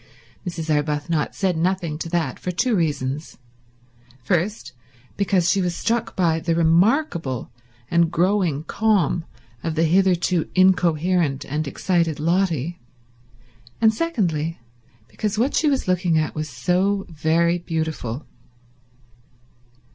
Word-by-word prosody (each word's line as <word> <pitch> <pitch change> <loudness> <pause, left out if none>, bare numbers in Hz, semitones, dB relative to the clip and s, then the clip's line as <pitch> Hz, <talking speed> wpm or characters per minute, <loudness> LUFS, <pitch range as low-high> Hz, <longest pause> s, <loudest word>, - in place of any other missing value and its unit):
Mrs. 165 -2 -2
Arbuthnot 150 +1 -1
said 185 -3 0
nothing 170 -2 -1
to 165 - -4
that 165 -6 -1
for - - -4
two 235 +8 0
reasons—first, 130 - -4 0.4
because 190 -3 +1
she 195 - +2
was 175 -1 -1
struck 235 0 -1
by 165 -3 +2
the 165 0 0
remarkable 170 - +1 0.4
and 170 -1 +3
growing 175 -4 +1
calm 185 -5 +1 0.4
of 165 -1 -2
the 165 - +2
hitherto 180 0 +2
incoherent 175 -5 +2
and 150 0 -3
excited 165 +1 0
Lotty, 170 -1 0 1.0
and 220 -1 +4
secondly 175 - -1 0.5
because 205 - -3
what 250 +6 +1
she 310 - +3
was 275 -7 0
looking 180 -2 +2
at 155 0 0
was 155 0 -4
so 185 +9 0
very 165 +2 +1
beautiful. 160 -6 -3
170 Hz, 115 wpm, -22 LUFS, 150-185 Hz, 1.0 s, and